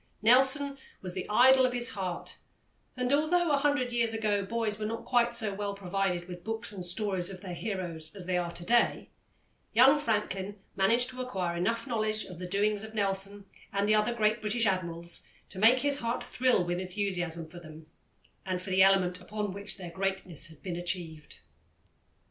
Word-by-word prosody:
Nelson 270 +4 +5 0.2
was 180 -1 -3
the 185 -1 -5
idol 260 +4 +6
of 255 -1 +2
his 245 0 0
heart, 190 -7 -4 0.6
and 250 +1 0
although 320 +3 +2
a 285 - +4
hundred 280 -3 +1
years 230 -2 +1
ago 210 -2 0
boys 215 +1 -1
were 215 - -2
not 230 +1 -5
quite 240 -1 +2
so 220 -4 +2
well 200 0 -3
provided 185 -2 -2
with 175 -1 -9
books 225 0 -3
and 190 -3 -6
stories 185 0 -1
of 185 -2 -9
their 185 -3 -6
heroes 175 -5 -4
as 190 -3 -6
they 185 0 -1
are 175 -1 0
to 170 0 -9
day, 240 +3 +2 0.6
young 265 +6 +6
Franklin 205 -5 -2 0.2
managed 230 +6 +3
to 255 0 -6
acquire 185 -9 -2
enough 230 +9 -1
knowledge 215 -4 -1
of 180 -2 -10
the 180 - -5
doings 205 +2 +1
of 220 0 -9
Nelson, 200 0 -2 0.3
and 200 +1 0
the 215 - +4
other 215 +2 +3
great 215 0 +1
British 220 +2 0
Admirals, 170 -3 -2 0.3
to 185 - -8
make 235 +5 +6
his 285 0 +1
heart 235 +1 -2
thrill 250 -7 +2
with 175 0 -1
enthusiasm 180 -3 -2
for 160 +2 -11
them, 155 -1 -12 0.6
and 185 -1 -2
for 185 +1 -7
the 190 0 +4
element 190 -2 +4
upon 210 -2 -4
which 200 +1 -2
their 180 -3 -7
greatness 190 -4 -2
had 160 -2 -16
been 175 -3 -4
achieved. 175 -3 -5
200 Hz, 190 wpm, -30 LUFS, 180-230 Hz, 0.6 s, idol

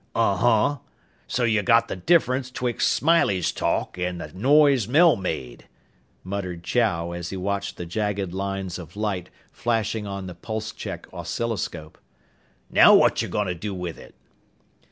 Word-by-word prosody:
"Uh - - +2
huh. 120 +5 +2 0.5
So 125 - -1
you 110 -3 +2
got 115 +1 +4
the - - -4
difference 130 - +2
betwixt 125 -2 0
Smiley's 130 - +2
talk - - -2
an' 90 0 -2
the - - -8
noise 135 +2 +4
Mel 160 +6 +5
made," 80 -10 -5 0.6
muttered 90 -3 -5
Chow 85 -7 0
as 85 0 -5
he 95 - -5
watched 100 +1 -3
the 90 - -5
jagged 100 0 -2
lines 95 -2 -3
of 85 0 -11
light 105 -4 -3 0.2
flashing 110 -2 -1
on 100 -1 -5
the 90 - -7
pulse 110 +5 -5
check - - -7
oscilloscope. 90 -9 -4 0.7
"Now - - +8
what're - - +6
you - - -3
fixin' 105 - -1
to 90 - -2
do 95 +3 -5
with 90 -2 -5
it?" - - -14
100 Hz, 155 wpm, -24 LUFS, 90-115 Hz, 0.7 s, Now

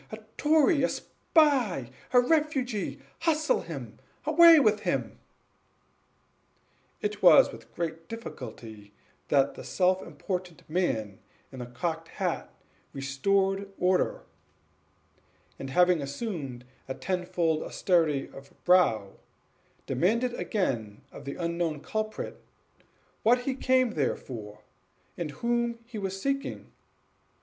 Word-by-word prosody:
a 215 - -5 0.2
tory! 305 0 +4
a 260 - +2
spy! 250 - +1 0.2
a 250 - +7
refugee! 260 -6 0 0.2
hustle 310 -2 +2
him! 135 -10 -8 0.3
away 330 +1 +8
with 215 -6 +3
him!" - - -2 1.8
It 420 0 -2
was - - +7
with - - -13
great 165 -1 -4
difficulty 110 - -9 0.3
that 140 -1 +3
the - - -9
self 185 0 +1
important 180 -3 -6
man 110 - -1 0.3
in 130 - -9
the 125 - -6
cocked 160 +6 -3
hat - - -3 0.4
restored 195 +9 0
order; 180 0 +1 1.4
and, 135 - -5
having 180 +2 +4
assumed 140 - -5 0.2
a 130 - -4
tenfold 175 -3 -1
austerity 160 -7 +1
of 135 0 -13
brow, 110 - +3 0.7
demanded 230 +7 +1
again 120 - -2
of - - -11
the 140 - -5
unknown 170 -2 -2
culprit 215 +6 -4 0.8
what 245 +3 +4
he 265 +2 -1
came 255 -2 +2
there 145 -8 0
for, 105 -4 -9 0.5
and 170 -3 -4
whom 235 - -1
he 230 -2 -7
was 195 -1 -3
seeking? 225 - -3
180 Hz, 110 wpm, -28 LUFS, -, 1.8 s, away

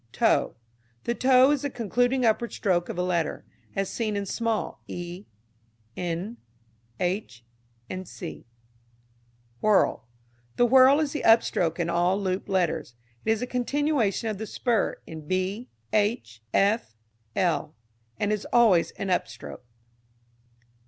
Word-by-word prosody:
Toe. - - +2 0.5
The 235 - 0
toe 255 +2 +5
is 290 -3 +1
the 285 - -2
concluding 245 +2 +1
upward 225 +1 +1
stroke 175 -4 0
of - - -5
a 180 - 0
letter, 170 -3 -1 0.3
as 195 0 0
seen 215 -1 -2
in 200 0 -2
small 225 +2 -2
e, 175 +3 -7 0.7
n, 180 +6 -3 0.6
h, 175 - -3 0.6
&c. 95 - -9 1.1
Whirl. 205 - +2 0.5
The 245 - +4
whirl 260 +3 +6
is 305 -3 0
the 295 - -3
upstroke 180 -7 +3
in 170 - 0
all 175 +3 +2
looped 190 -1 -2
letters. 180 -10 0 0.3
It - - -1
is 225 +1 +2
a - - 0
continuation 250 - 0
of 215 -3 -3
the 220 - -4
spur 235 -2 0
in 155 -2 -9
b, 185 +6 -2 0.2
h, 205 - 0
f, 200 - +1 0.4
l, 155 -4 0 0.4
and 205 +1 +1
is 210 - -3
always 220 -8 +5
an 195 - -3
upstroke. 180 - -3
205 Hz, 130 wpm, -26 LUFS, 175-240 Hz, 1.1 s, whirl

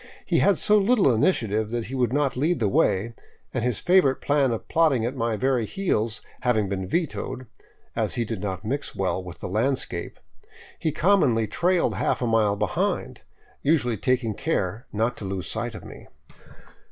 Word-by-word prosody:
He - - +2
had 200 -4 +4
so 210 +6 +4
little 200 - +4
initiative 110 - +1
that 120 -1 -2
he 130 - -8
would 125 -3 +1
not 140 -1 +1
lead 155 +5 +1
the 110 - +2
way, 100 +3 +1 0.4
and 120 - -1
his 125 -3 0
favorite 175 -7 +4
plan 145 -2 +2
of 115 - -4
plodding 150 -8 +2
at 125 +3 -3
my 115 -3 -1
very 130 0 +1
heels 115 - -1 0.2
having 110 -5 +1
been 95 -1 -3
vetoed, 135 - -2 0.5
as - - -1
he 120 -2 0
did 110 -3 -5
not 100 0 -4
mix 140 +6 -3
well 95 -1 -1
with 90 -2 -10
the - - -4
landscape, 120 +8 -2 0.6
he 160 - 0
commonly 150 - +3
trailed 175 - +1
a - - -6
half - - 0
mile 110 -3 +2
behind, 105 -1 -1 0.4
usually 140 -6 +2
taking 120 +1 0
care 110 - -2
not 115 +3 0
to - - -8
lose 95 -1 -3
sight 115 0 -3
of - - -9
me. - - -11
120 Hz, 175 wpm, -25 LUFS, 110-145 Hz, 0.6 s, had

